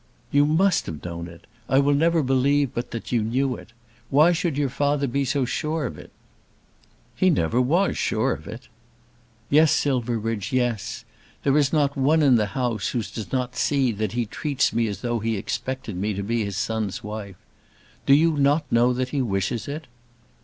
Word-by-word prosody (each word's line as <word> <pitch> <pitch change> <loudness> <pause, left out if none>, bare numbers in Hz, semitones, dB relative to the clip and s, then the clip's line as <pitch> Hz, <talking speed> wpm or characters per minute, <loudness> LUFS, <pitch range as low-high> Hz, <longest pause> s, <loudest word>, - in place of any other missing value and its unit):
"You 145 +1 +4
must 175 +4 +2
have 80 0 -7
known 85 -1 -5
it. 85 -1 -14 0.2
I 135 - +3
will 140 +1 +4
never 165 +2 +3
believe 135 +1 +2
but 120 - -4
that 115 - -6
you 120 -2 +2
knew 125 +4 0
it. - - -13 0.4
Why 150 +5 +5
should 170 -4 -1
your 145 -1 +1
father 145 +1 +1
be 140 +2 0
so 135 0 0
sure 155 +4 -2
of 80 - -4
it?" - - -12 1.1
"He 185 - +3
never 120 - +2
was 170 +10 +1
sure 115 +4 +1
of - - -9
it." 110 +5 -9 0.8
"Yes, 155 +1 +5
Silverbridge; 115 -5 -1
yes. 120 -5 -1 0.4
There 140 -1 +2
is 145 -3 +3
not 145 -3 +1
one 150 +4 +3
in 135 -3 +5
the 105 -3 +2
house 120 -5 -1
who 120 - -1
does 110 0 -7
not 125 -1 -2
see 135 -4 +1
that 105 -2 -3
he 120 -1 0
treats 140 +5 -1
me 115 0 +1
as 100 -2 -5
though 120 -1 -1
he 110 0 -1
expected 130 +2 -4
me 100 +3 -2
to 100 - -3
be 115 +2 -1
his 100 -1 -4
son's 110 -2 -2
wife. 105 -3 -7 0.7
Do 140 - +7
you 160 +1 +3
not 145 +2 +3
know 120 +2 +4
that 125 +1 -2
he 140 0 -1
wishes 100 0 -2
it?" 150 +3 -5
125 Hz, 190 wpm, -24 LUFS, 110-145 Hz, 1.1 s, Do